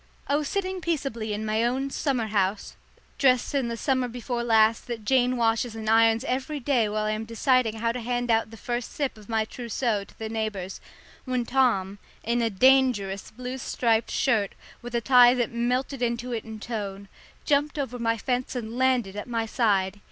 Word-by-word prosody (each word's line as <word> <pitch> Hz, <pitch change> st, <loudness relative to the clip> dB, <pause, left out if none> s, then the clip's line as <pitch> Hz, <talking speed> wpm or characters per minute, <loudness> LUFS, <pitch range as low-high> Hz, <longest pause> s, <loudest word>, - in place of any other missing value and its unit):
I 285 Hz, -, +1 dB
was 295 Hz, -1 st, 0 dB
sitting 375 Hz, 0 st, -2 dB
peaceably 270 Hz, -10 st, -2 dB
in 210 Hz, +1 st, -3 dB
my 215 Hz, +1 st, +1 dB
own 265 Hz, +3 st, 0 dB
summer 265 Hz, -7 st, 0 dB
house, 200 Hz, -1 st, -1 dB, 0.4 s
dressed 255 Hz, -1 st, +3 dB
in 270 Hz, -4 st, +1 dB
the 235 Hz, 0 st, -4 dB
summer 260 Hz, +1 st, 0 dB
before 240 Hz, 0 st, -4 dB
last 225 Hz, -1 st, +3 dB
that 230 Hz, -3 st, -5 dB
Jane 255 Hz, 0 st, +3 dB
washes 225 Hz, 0 st, +1 dB
and 220 Hz, -1 st, -6 dB
irons 225 Hz, +1 st, +4 dB
every 270 Hz, +3 st, -2 dB
day 245 Hz, -5 st, +1 dB
while 215 Hz, 0 st, -1 dB
I 215 Hz, -, 0 dB
am 215 Hz, +1 st, -2 dB
deciding 230 Hz, 0 st, +1 dB
how 230 Hz, +1 st, 0 dB
to 250 Hz, -, -4 dB
hand 245 Hz, 0 st, -1 dB
out 225 Hz, 0 st, +2 dB
the 225 Hz, -, -11 dB
first 240 Hz, +2 st, -4 dB
sip 280 Hz, -3 st, -2 dB
of 215 Hz, -1 st, -16 dB
my 220 Hz, -1 st, +1 dB
trousseau 230 Hz, -2 st, -2 dB
to -, -, -21 dB
the 220 Hz, -, -5 dB
neighbours, 215 Hz, -4 st, -4 dB, 0.4 s
when 255 Hz, -2 st, -1 dB
Tom, 215 Hz, -7 st, +1 dB, 0.2 s
in 235 Hz, +2 st, 0 dB
a 230 Hz, -, +1 dB
dangerous 220 Hz, -4 st, +3 dB
blue 250 Hz, +3 st, -6 dB
striped 230 Hz, -2 st, 0 dB
shirt, 220 Hz, -7 st, +1 dB, 0.3 s
with 240 Hz, 0 st, -6 dB
a 235 Hz, -, +1 dB
tie 250 Hz, -1 st, +7 dB
that 240 Hz, -2 st, -1 dB
melted 250 Hz, +3 st, -1 dB
into 240 Hz, +1 st, -1 dB
it 230 Hz, -2 st, -3 dB
in 220 Hz, -1 st, -8 dB
tone, 200 Hz, -3 st, -5 dB, 0.4 s
jumped 295 Hz, +1 st, +1 dB
over 250 Hz, -4 st, -3 dB
my 230 Hz, -1 st, +1 dB
fence 250 Hz, +3 st, -2 dB
and 235 Hz, 0 st, -4 dB
landed 250 Hz, -7 st, +2 dB
at 210 Hz, -, -5 dB
my 230 Hz, -1 st, -1 dB
side. 205 Hz, -4 st, +1 dB
235 Hz, 195 wpm, -26 LUFS, 220-255 Hz, 0.4 s, tie